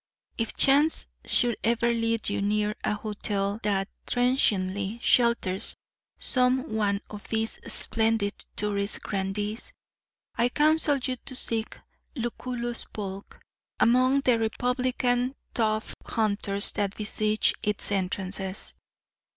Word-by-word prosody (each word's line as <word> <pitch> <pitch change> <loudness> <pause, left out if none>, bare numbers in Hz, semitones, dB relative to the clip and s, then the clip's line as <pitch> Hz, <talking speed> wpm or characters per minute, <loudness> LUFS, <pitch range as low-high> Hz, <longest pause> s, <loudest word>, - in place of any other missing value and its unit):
If 225 -1 -2
chance 290 +4 +4 0.2
should 240 -2 +2
ever 235 +1 +2
lead 230 -1 0
you 200 - -1
near 210 +1 0
a - - 0
hotel 205 -1 -3
that 195 -2 0 0.2
transiently 205 -5 +1
shelters 235 -6 +1 0.4
some 255 +1 +1
one 205 -2 0
of 210 -1 -9
these 225 0 -1
splendid 220 -2 +6 0.2
touring 200 -1 -1
grandees, 205 +3 -3 0.6
I 240 0 +2
counsel 305 +1 +3
you 255 -1 -3
to 260 - -5
seek 225 -2 +1 0.4
Lucullus 240 -1 -4
Polk 195 -1 -8 0.4
among 255 +3 +4
the 250 -4 +2
republican 250 +2 0 0.2
tuft 215 -1 -1
hunters 200 -2 +1
that 200 -1 -3
besiege 215 0 +1
its 210 -1 -1
entrances. 190 0 -3
220 Hz, 110 wpm, -26 LUFS, 205-245 Hz, 0.6 s, splendid